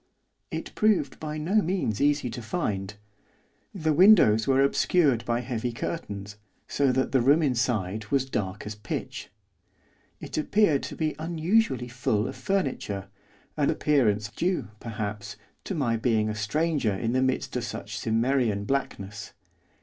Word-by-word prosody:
It - - -5
proved 205 -11 +1
by 155 -1 -4
no 185 +8 +2
means 170 - -1
easy 145 -3 +2
to 120 - -6
find. 105 - -3 0.8
The 160 -5 0
windows 155 - +6
were 135 0 +4
obscured 140 -3 +2
by 120 0 0
heavy 120 -1 -3
curtains, 105 -6 -5 0.3
so 140 -2 +2
that 130 +1 0
the 130 - +3
room 145 +6 +4
inside 110 -6 0
was 135 +2 +1
dark 100 -5 -3
as 105 - -4
pitch. 105 -3 -6 0.9
It - - -4
appeared 160 -3 +3
to - - -7
be 155 -1 -1
unusually 165 - +1
full 120 -3 0
of - - -6
furniture, 130 - -2 0.5
an 145 -2 +1
appearance 110 -8 +2
due, 180 -5 -1
perhaps, 105 -2 -5 0.3
to 195 - -3
my 120 -7 +1
being 110 -2 +1
a - - -2
stranger 130 +1 0
in 115 +4 -2
the 130 - +2
midst 130 0 -1
of - - -1
such - - -5
Cimmerian 115 -2 +1
blackness. 105 -6 -3
125 Hz, 145 wpm, -27 LUFS, 110-155 Hz, 0.9 s, windows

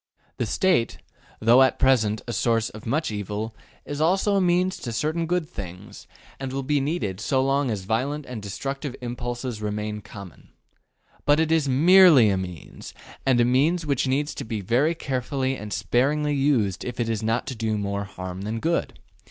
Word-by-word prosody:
The - - -1
State, 180 - +1 0.4
though 120 +4 +6
at 130 -1 +4
present 110 -5 +2
a 120 - -3
source 115 +1 +1
of 110 +1 -10
much 145 +1 0
evil, 105 +2 -4 0.3
is 145 +1 -4
also 195 +5 +2
a 195 - +3
means 180 +1 +2
to 120 - -6
certain 155 +8 -1
good 175 -2 0
things, 90 -3 -9 0.3
and 135 -1 -4
will 135 +1 -3
be 145 +2 +1
needed 125 - -2
so 130 +5 0
long 135 0 +1
as 105 -4 -3
violent 135 +9 -1
and 125 -4 -7
destructive 135 +7 -5
impulses 120 -1 -5
remain 105 0 -3
common. 100 -3 -12 0.8
But 145 +1 +5
it 160 0 +1
is 160 -4 +2
MERELY 155 - +7
a 95 - 0
means, 90 -5 -8 0.3
and 130 -2 +4
a 120 - +5
means 150 +8 +2
which 140 -2 0
needs 145 +3 0
to 140 - -6
be 110 -3 -4
very 125 - +1
carefully 135 -2 -2
and 105 -4 -8
sparingly 135 +10 +1
used 135 -9 +1
if 125 -1 -6
it 120 - 0
is 115 -2 -1
not 115 +2 0
to 130 - -5
do 110 -1 -1
more 100 0 -2
harm 95 -1 -7
than 110 +3 -3
good. 170 +7 -1
125 Hz, 185 wpm, -24 LUFS, 105-145 Hz, 0.8 s, MERELY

